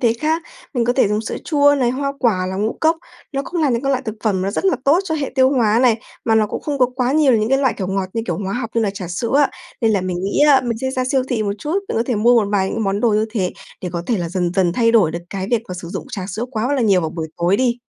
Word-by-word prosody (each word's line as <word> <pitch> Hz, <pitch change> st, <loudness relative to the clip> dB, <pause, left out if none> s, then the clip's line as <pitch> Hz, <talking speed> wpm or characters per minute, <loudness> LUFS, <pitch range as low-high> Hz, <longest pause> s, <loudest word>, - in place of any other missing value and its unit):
thế 235 Hz, -3 st, +3 dB
khác. 320 Hz, +2 st, 0 dB, 0.3 s
Mình 240 Hz, -2 st, +1 dB
có 245 Hz, -, +2 dB
thể 250 Hz, -5 st, +3 dB
dùng 210 Hz, +1 st, 0 dB
sữa -, -, -5 dB
chua 285 Hz, -2 st, +4 dB
này, 250 Hz, -4 st, +1 dB
hoa 275 Hz, +2 st, -2 dB
quả 190 Hz, -8 st, +1 dB
là 190 Hz, -, -4 dB
ngũ 215 Hz, +3 st, 0 dB
cốc, 320 Hz, +1 st, +3 dB, 0.4 s
nó 275 Hz, -, -1 dB
cũng 345 Hz, -1 st, -3 dB
là 295 Hz, -, +3 dB
những 235 Hz, +2 st, 0 dB
cái 275 Hz, -, 0 dB
loại 265 Hz, -1 st, 0 dB
thực 220 Hz, -4 st, -5 dB
phẩm 190 Hz, -4 st, +1 dB
nó 195 Hz, -, -1 dB
rất 210 Hz, -, -3 dB
là 385 Hz, -, +3 dB
tốt 300 Hz, +6 st, +4 dB
cho 325 Hz, -4 st, -2 dB
hệ 295 Hz, -3 st, -2 dB
tiêu 260 Hz, -1 st, +4 dB
hóa 230 Hz, -5 st, +3 dB
này, 235 Hz, -3 st, +4 dB, 0.3 s
mà 225 Hz, -, +2 dB
nó 215 Hz, -1 st, +3 dB
cũng -, -, -5 dB
không 290 Hz, -2 st, -2 dB
có 250 Hz, -, +5 dB
quá 250 Hz, +1 st, +1 dB
nhiều 295 Hz, -4 st, +4 dB
những 215 Hz, +1 st, 0 dB
cái 270 Hz, +1 st, +3 dB
loại, 260 Hz, -3 st, +1 dB
kiểu, 190 Hz, -, -3 dB
ngọt 190 Hz, -1 st, -2 dB
như 225 Hz, -, -2 dB
kiểu -, -, -2 dB
hóa 195 Hz, -1 st, -3 dB
học 235 Hz, -1 st, -3 dB
như 230 Hz, -, +2 dB
là 205 Hz, -, +1 dB
trà 190 Hz, -3 st, -7 dB
sữa 225 Hz, +8 st, -3 dB
á. 290 Hz, -, +3 dB, 0.3 s
Nên 225 Hz, -3 st, +3 dB
là 200 Hz, -, +2 dB
mình 185 Hz, -1 st, -3 dB
nghĩ 200 Hz, -, 0 dB
á 270 Hz, -2 st, +6 dB
mình 230 Hz, -2 st, -2 dB
sẽ 260 Hz, +2 st, -2 dB
ra 255 Hz, -1 st, -1 dB
siêu 260 Hz, 0 st, +1 dB
thị 230 Hz, -4 st, 0 dB
một 200 Hz, -1 st, -1 dB
chút, 315 Hz, -, -1 dB
mình -, -, -2 dB
có 230 Hz, -, +2 dB
thể 250 Hz, -, 0 dB
mua 235 Hz, +3 st, +4 dB
một -, -, -4 dB
vài 190 Hz, -2 st, +1 dB
những 225 Hz, -, -2 dB
món 195 Hz, +1 st, 0 dB
đồ 235 Hz, -, +3 dB
như 215 Hz, +1 st, +2 dB
thế 195 Hz, -6 st, -1 dB, 0.3 s
để 180 Hz, -, -3 dB
có 170 Hz, -1 st, -3 dB
thể 235 Hz, -, +1 dB
là 170 Hz, -1 st, -2 dB
dần 175 Hz, 0 st, -1 dB
dần 185 Hz, -3 st, +2 dB
thay 230 Hz, +2 st, +2 dB
đổi 205 Hz, -9 st, +4 dB
được 170 Hz, -, -4 dB
cái 190 Hz, -1 st, -3 dB
việc 235 Hz, -2 st, +1 dB
mà 180 Hz, -, -5 dB
sử 170 Hz, -, -7 dB
dụng -, -, -5 dB
trà 195 Hz, -5 st, -4 dB
sữa 220 Hz, +5 st, -3 dB
quá 245 Hz, +3 st, -1 dB
là 260 Hz, -, +1 dB
nhiều 195 Hz, -4 st, +4 dB
vào 160 Hz, -2 st, -2 dB
buổi 160 Hz, -2 st, -5 dB
tối 175 Hz, +3 st, +2 dB
đi. 245 Hz, 0 st, +1 dB
230 Hz, 330 wpm, -19 LUFS, 195-260 Hz, 0.4 s, á